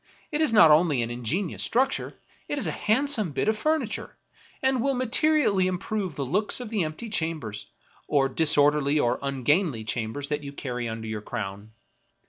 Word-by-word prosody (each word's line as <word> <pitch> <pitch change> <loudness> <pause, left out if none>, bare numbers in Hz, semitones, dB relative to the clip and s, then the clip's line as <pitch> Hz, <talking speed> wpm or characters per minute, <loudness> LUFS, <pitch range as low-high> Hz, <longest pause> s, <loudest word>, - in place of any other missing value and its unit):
It 300 0 -1
is 310 - +3
not 210 -8 +7
only 150 -5 +4
an 115 - -4
ingenious 140 - -2
structure, 265 +3 0 0.3
it 290 - -2
is 280 - -1
a - - 0
handsome 220 - 0
bit 140 - -1
of 220 - +3
furniture, 270 -1 -2 0.5
and 265 -2 +2
will 275 +2 +1
materially 250 -5 +2
im 185 -1 -1
prove 195 -4 -3
the 140 - -3
looks 205 - -1
of 240 -3 -7
the 210 -5 +1
empty 155 +9 -5
chambers, 160 - -3 0.4
or 135 -2 +3
disorderly 150 0 +3
or 120 -2 +1
ungainly 140 - 0
chambers 115 +6 -3
that 150 0 -2
you 140 0 -7
carry 125 -4 -4
under 110 0 -6
your 110 -1 -4
crown. 100 -2 -6
155 Hz, 175 wpm, -26 LUFS, 130-220 Hz, 0.5 s, not